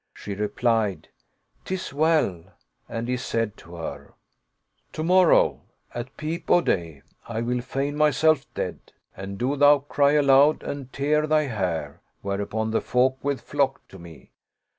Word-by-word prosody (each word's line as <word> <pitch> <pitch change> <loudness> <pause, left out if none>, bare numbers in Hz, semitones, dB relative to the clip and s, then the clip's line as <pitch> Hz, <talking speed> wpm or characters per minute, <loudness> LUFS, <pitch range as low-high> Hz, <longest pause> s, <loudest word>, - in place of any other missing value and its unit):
She 105 - -6
replied, 105 0 -1 0.3
" - - -43
'Tis 185 -5 -4
well; 150 - +1 0.2
" - - -44
and 115 +1 -4
he 125 0 0
said 115 -4 -2
to 85 - -13
her, 85 -1 -8 0.8
"To 155 - -3
morrow, 180 0 +4 0.3
at 120 +2 -7
peep 160 +2 -5
o' - - +6
day 85 - -2 0.2
I 115 -1 -3
will 125 +1 -1
feign 135 +3 -3
myself 150 0 +2
dead, - - -3 0.4
and 95 +1 -7
do 130 +6 0
thou 145 +1 +6
cry 140 0 +1
aloud 145 0 +4
and 135 -2 -6
tear 150 +2 +1
thy 155 0 +3
hair, 90 - -3 0.2
where 100 0 -2
upon 110 +2 -2
the 110 - +1
folk 130 +1 +1
will 140 -1 0
flock 140 -1 -2
to 95 - -13
me. 85 -3 -14
130 Hz, 160 wpm, -24 LUFS, 105-145 Hz, 0.8 s, o